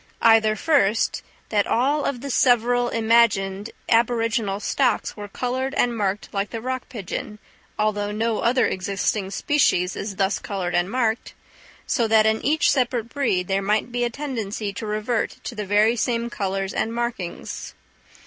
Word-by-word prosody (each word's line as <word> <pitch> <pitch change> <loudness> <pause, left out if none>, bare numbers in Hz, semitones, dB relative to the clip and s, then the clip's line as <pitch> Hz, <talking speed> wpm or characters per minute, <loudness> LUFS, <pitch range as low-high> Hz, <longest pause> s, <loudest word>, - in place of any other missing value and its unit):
Either, 220 -1 +5
first, 225 -5 +2 0.3
that 205 -2 +1
all 280 +5 +1
the 275 +1 -6
several 245 -1 +3
imagined 220 -3 +2 0.2
aboriginal 230 -3 +1
stocks - - 0
were 205 -1 -7
coloured 255 +5 -3
and 240 -1 +2
marked 205 -1 -1
like 200 0 -1
the 230 - -5
rock 255 +2 -4
pigeon, 210 -1 -5 0.4
although 210 -1 0
no 220 +1 -1
other 250 +2 +3
existing 195 +1 -1
species 190 -5 +1
is 200 -1 -5
thus 195 +1 0
coloured 185 -3 -3
and 175 +1 +1
marked, 230 -1 -1 0.5
so 235 -3 +1
that 220 0 +5
in 220 0 +1
each 310 +3 +3
separate 245 -4 0
breed 215 -11 0
there 195 0 +1
might 210 +4 0
be 245 0 -1
a 240 - +1
tendency 225 -6 -4
to 215 - -6
revert 215 +2 -1
to - - -5
the 210 -3 -5
very 210 +3 +4
same 235 0 -1
colours 195 -2 -2
and 225 +1 -1
markings. 235 -7 -4
220 Hz, 155 wpm, -23 LUFS, 200-240 Hz, 0.5 s, Either